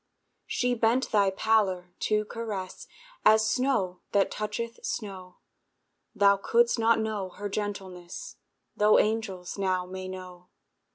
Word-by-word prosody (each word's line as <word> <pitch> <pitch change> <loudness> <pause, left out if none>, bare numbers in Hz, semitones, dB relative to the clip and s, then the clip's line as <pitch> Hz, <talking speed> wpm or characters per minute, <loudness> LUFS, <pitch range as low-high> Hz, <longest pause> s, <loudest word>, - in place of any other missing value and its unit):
She 250 0 0
bent 240 +2 +1
thy 200 -2 +4
pallor 190 -3 +1 0.2
to 215 0 +2
caress, 210 -5 -6 0.4
As 220 0 +5
snow 220 -9 0
that 200 -1 +3
toucheth 215 +2 -4
snow; 185 -4 -5 0.8
Thou 200 -1 +5
couldst 235 +4 +2
not 225 0 +4
know 215 -4 -2
her 205 +3 -6
gentleness, 195 - -5 0.4
Tho' 210 +1 +5
angels 205 -4 -1
now 185 -2 0
may 185 +1 -7
know. 180 -1 -9
205 Hz, 120 wpm, -28 LUFS, 185-220 Hz, 0.8 s, As